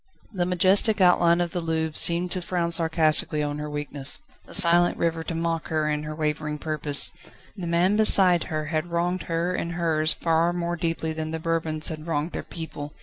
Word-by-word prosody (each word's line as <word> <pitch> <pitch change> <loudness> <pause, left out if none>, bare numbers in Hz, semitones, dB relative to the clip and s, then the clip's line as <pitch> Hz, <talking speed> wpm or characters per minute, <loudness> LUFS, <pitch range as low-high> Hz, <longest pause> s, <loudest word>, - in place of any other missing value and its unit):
The 180 -4 -2
majestic 190 +4 +3
outline 175 -2 +3
of 175 -1 -2
the 180 - -3
Louvre 160 -1 -3
seemed 175 +1 +4
to 185 - -4
frown 170 -1 -2
sarcastically 160 -2 +2
on 145 0 -4
her 150 0 -5
weakness, 145 -2 -3 0.3
the - - -13
silent 175 +1 +4
river 165 -1 -2
to 165 - -5
mock 165 -1 -3
her 155 -1 -1
and 150 0 -2
her 155 0 -6
wavering 150 -1 -3
purpose. 150 -2 +2 0.4
The 185 -4 -6
man 175 +5 +1
beside 185 -5 +5
her 155 -1 -4
had 155 +2 -1
wronged 175 +2 -2
her 170 +2 -1
and 170 -1 -4
hers 160 -2 +1
far 165 +1 0
more 175 0 -3
deeply 165 -1 -3
than 155 0 -5
the 160 - -4
Bourbons 160 -1 0
had 155 0 -8
wronged 160 +1 -2
their - - -5
people. 150 -3 -8
165 Hz, 195 wpm, -24 LUFS, 155-175 Hz, 0.4 s, beside